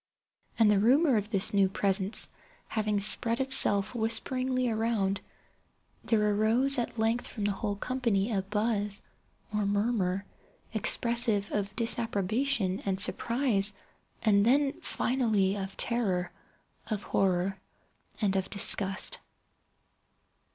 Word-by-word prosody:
And 220 -2 +4
the 205 - +2
rumour 265 +6 +3
of 210 -1 -2
this 200 -2 -1
new 195 -1 +2
presence 195 +1 +3 0.4
having 210 -2 -1
spread 230 +3 +6
itself 215 -6 +4
whisperingly 255 +2 0
around, 220 -4 -1 0.8
there 210 -2 +1
arose 240 +6 +1
at 235 - -5
length 225 +2 0
from 210 - -7
the 205 - 0
whole 205 +1 -4
company 235 -2 -2
a 200 -3 -1
buzz, 210 0 -2 0.5
or 210 0 -1
murmur, 200 -2 -1 0.5
expressive 225 -2 +2
of 200 -1 -3
disapprobation 225 -1 -1
and 190 -1 -3
surprise—then, 230 +2 0
finally, 220 -7 -1
of 195 -1 -7
terror, 195 -7 -2 0.6
of 210 -3 -4
horror, 190 0 -1 0.6
and 200 -3 0
of 190 -1 -2
disgust. 195 -1 +2
210 Hz, 110 wpm, -28 LUFS, 195-235 Hz, 0.8 s, spread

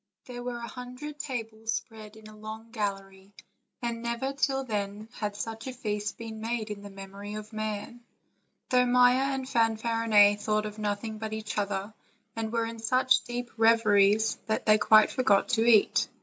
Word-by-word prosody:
There 245 -1 -7
were 245 0 -4
a 235 0 -6
hundred 250 +5 -8
tables 225 -5 -4
spread 220 -3 -7
in 220 0 -15
a 215 - -13
long 220 +1 -9
gallery, 195 -2 -5 0.5
and 235 -1 -2
never 235 +3 -2
till 270 -1 0
then 210 -2 -4
had 210 -3 -4
such 225 +3 -5
a 260 - -4
feast 210 -4 -3
been 220 -1 -7
made 225 -1 -3
in 205 -1 -6
the 205 - -9
memory 195 +1 -8
of 215 +1 -8
man, 215 +2 -4 0.7
though 250 -1 +4
Maia 250 +2 +4
and 265 -1 -4
Fanfarinet 225 -3 +3
thought 215 0 0
of 210 0 -7
nothing 215 +1 -3
but 220 0 -4
each 220 -1 -5
other, 200 +1 -3 0.4
and 225 -1 -3
were 230 -1 0
in 230 0 -6
such 255 +3 +3
deep 245 0 -5
reveries 220 -1 +4
that 220 - -1
they 215 0 +5
quite 215 0 +6
for 255 - -1
got 200 -5 +3
to 225 -2 +2
eat. 215 -3 +4
220 Hz, 180 wpm, -28 LUFS, 210-240 Hz, 0.7 s, quite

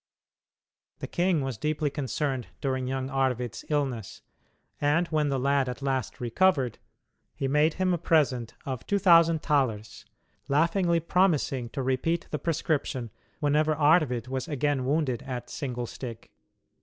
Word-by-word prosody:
The - - -5
king 175 -3 +1
was 130 -5 -4
deeply 150 -1 -1
concerned 135 -2 -2
during 130 -2 -1
young 130 0 -3
Arvid's 125 -3 -1
illness, 135 -8 -2 0.6
and 150 +4 +3
when 155 -2 +1
the 135 - 0
lad 135 0 +1
at 125 +2 -6
last 135 -2 -2
recovered 130 - +1 0.6
he 135 - -2
made 150 +3 +3
him 185 -1 +1
a 175 - -1
present 135 -8 +1
of 130 -4 -4
two 205 - +2
thousand 165 -4 +5
thalers, 115 -8 0 0.4
laughingly 170 +4 +2
promising 155 -8 +1
to 135 +1 -4
repeat 130 +6 0
the 150 - -2
prescription 145 -6 -1 0.3
whenever 150 +1 +2
Arvid 145 -6 +3
was 130 +3 -3
again 145 -3 0
wounded 135 -4 0
at 125 -2 -6
"single 125 -3 -4
stick." 115 -1 -8
140 Hz, 140 wpm, -27 LUFS, 130-155 Hz, 0.6 s, thousand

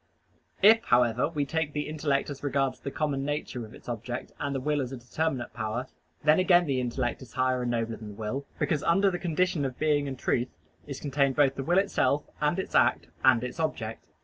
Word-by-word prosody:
If, 225 +3 +7
however, 120 +2 +3
we 150 -3 -1
take 155 0 -2
the 150 0 -2
intellect 145 -2 -1
as 140 - -8
regards 135 -2 0
the 140 - -5
common 140 -1 -1
nature 145 -4 -3
of 110 - -14
its - - -16
object 120 +1 -5
and 140 -1 -2
the - - 0
will 145 +2 0
as 130 -1 -4
a 135 - -5
determinate 125 +1 -2
power, 110 +4 -3 0.4
then 150 +3 +5
again 180 -1 +5
the 135 -4 0
intellect 120 0 -2
is 130 - -12
higher 130 -1 +1
and 125 - -1
nobler 115 -1 -1
than 110 - -9
the 105 - -8
will, 115 +6 -4
because 150 -4 0
under 195 +5 +3
the 175 - -4
notion 170 -1 +1
of 130 -2 -3
being 150 -2 +1
and 135 -1 -5
truth 120 0 0 0.4
is 140 - -6
contained 140 -2 +1
both 140 -2 +4
the 135 - -4
will 175 +6 +2
itself, 150 -8 +2 0.2
and 150 +4 +2
its 190 - -4
act, - - +3
and 115 - +5
its 125 +6 -5
object. 115 -8 -3
140 Hz, 220 wpm, -28 LUFS, 125-150 Hz, 0.4 s, If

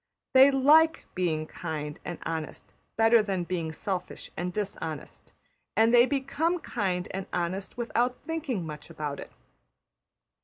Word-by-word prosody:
They 265 +1 +9
\emph{like} 305 +4 +5
being 165 -4 0
kind 155 -2 -5
and 175 - -5
honest 160 -1 -5 0.2
better 225 +1 +6
than 195 -4 -1
being 170 -2 -2
selfish 180 +2 -5
and 180 +1 -2
dishonest, 165 -6 -5 0.5
and 225 +2 +5
they 240 +1 +7
become 285 +5 0
kind 190 - -2
and 190 0 -4
honest 185 +5 -3
without 240 +1 0
thinking 295 - -2
much 150 0 -8
about 150 -3 -4
it. - - -9
190 Hz, 130 wpm, -28 LUFS, 165-250 Hz, 0.5 s, They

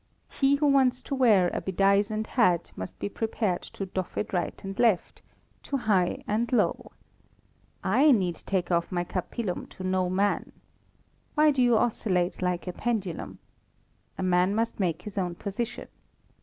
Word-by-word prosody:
He 275 0 +3
who 295 +1 0
wants 265 -3 +3
to - - -5
wear 215 -9 +4
a - - -2
bedizened 200 +3 +1
hat 185 -10 +2
must 95 0 -7
be - - -3
prepared 215 -3 -1
to 195 - -4
doff 185 -1 -5
it 210 - -3
right 175 -2 -2
and 195 +2 -6
left 225 -7 +2 0.4
to 280 - -2
high 195 -7 +1
and 225 +4 -1
low. 245 - 0 0.9
I 260 +11 +4
need 185 - +2
take 185 -2 -2
off 170 +1 +1
my 175 -1 0
capillum 185 +2 -4
to 185 - -10
no 185 -1 0
man. 200 +2 0 0.8
Why 305 0 +5
do 270 -3 +1
you 240 -2 +4
oscillate 185 -7 0
like 180 -1 -1
a 180 - -4
pendulum? 205 -8 -3 0.8
A - - -3
man 185 +2 +2
must 225 0 -1
make 180 -3 -1
his 210 -1 -5
own 175 -2 -2
position. 210 +6 -4
195 Hz, 160 wpm, -27 LUFS, 180-235 Hz, 0.9 s, Why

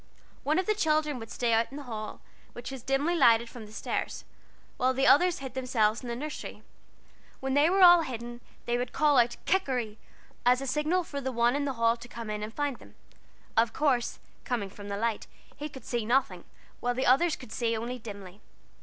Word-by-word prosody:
One 305 +3 +1
of 375 - +1
the 430 - +2
children 305 -7 +1
would 225 -1 -9
stay 235 -2 0
out 225 +1 +3
in 275 - -9
the 290 - -7
hall, 220 -4 -6 0.3
which 240 +2 -7
was 265 -2 -7
dimly 275 +7 +1
lighted 235 -6 +5
from 225 -3 -9
the - - -15
stairs, 220 - -4 0.5
while 255 +1 +2
the 270 +1 +2
others 355 +5 +5
hid 260 - -7
themselves 240 -4 +1
in 250 - -8
the 235 - -3
nursery. 300 +5 -6 0.8
When 265 0 -2
they 290 +3 +5
were 380 +1 +4
all 350 -1 +9
hidden, 240 -4 -6 0.2
they 240 0 0
would 245 0 -4
call 295 -3 +4
out 240 0 +2
"Kikeri," 250 - 0 0.4
as 250 +1 +4
a 270 - -4
signal 305 +7 +1
for 280 -3 -6
the 265 0 -2
one 240 +1 +2
in 285 0 0
the 275 - -1
hall 230 -1 +2
to 235 +1 -11
come 230 -2 -7
in 210 0 -3
and 215 +1 -5
find 285 0 -2
them. - - -17 0.6
Of 225 0 +3
course, 270 -6 +1 0.3
coming 225 -7 -2
from 205 0 -10
the 200 - -3
light 225 0 -1 0.3
he 300 +1 -6
could 265 -5 -12
see 240 -2 -1
nothing, 215 -7 0 0.3
while 245 0 -1
the 260 - 0
others 310 +6 +4
could 250 -4 -13
see 230 -2 0
only 245 +3 -4
dimly. 200 -3 -10
250 Hz, 215 wpm, -29 LUFS, 230-285 Hz, 0.8 s, all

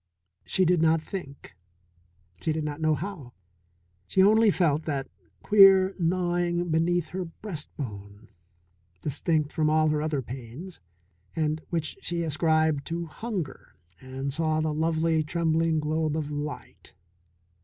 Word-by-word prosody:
She 190 - +2
did 175 -1 +3
not 165 0 +4
think, 155 - -8 0.9
she 160 - 0
did 155 0 -2
not 150 +1 -4
know 155 -1 +3
how. 155 -7 -7 0.7
She 190 - +3
only 220 +2 +5
felt 160 -5 +1
that 140 -3 -2 0.4
queer 195 -2 +7
gnawing 175 0 0
beneath 170 +1 +1
her 185 0 -4
breastbone, 120 - -7 0.7
distinct 150 - 0
from 155 -2 +1
all 155 0 +3
her 150 0 0
other 150 -3 -1
pains, 130 +9 -9 0.6
and 155 -1 -1
which 165 -2 -2
she 170 -1 -2
ascribed 155 -2 +1
to 170 0 -3
hunger, 180 - -6 0.2
and 130 +1 -5
saw 155 0 0
the 155 -1 0
lovely, 160 +1 +1
trembling 160 0 +1
globe 155 0 -1
of 150 -2 -3
light. 145 -7 -7
160 Hz, 130 wpm, -27 LUFS, 150-175 Hz, 0.9 s, queer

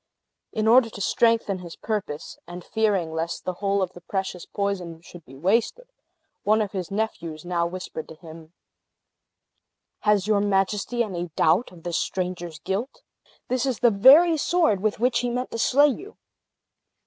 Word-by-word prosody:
In 220 0 -1
order 235 +1 +6
to 210 - -10
strengthen 225 -2 +2
his 170 -2 -9
purpose, 205 -9 -4
and 175 +1 -8
fearing 200 -7 0
lest 165 +1 -3
the 185 - -1
whole 200 -1 +1
of 185 0 -5
the 175 - -12
precious 190 0 -4
poison 185 -5 -3
should 170 0 -13
be 135 - -14
wasted, 225 - 0 0.6
one 215 +2 +3
of 210 -2 -1
his 185 -4 -4
nephews 175 -7 -4
now 170 -1 0
whispered 175 -2 -7
to 160 - -10
him: 160 0 -13 1.5
"Has 210 -2 +2
your 210 -1 +2
Majesty 205 +4 0
any 175 -5 -4
doubt 160 +10 +2
of 170 -2 -15
this 175 -1 -1
stranger's 180 -3 -3
guilt? 230 - -4 0.4
This 255 -1 0
is 260 -4 0
the 240 - +5
very 290 - +7
sword 320 - +2
with 215 +1 -1
which 250 +1 +2
he 245 - -1
meant 250 +1 -3
to 230 - -4
slay 285 +5 +5
you. 400 - -7
200 Hz, 165 wpm, -24 LUFS, 175-230 Hz, 1.5 s, very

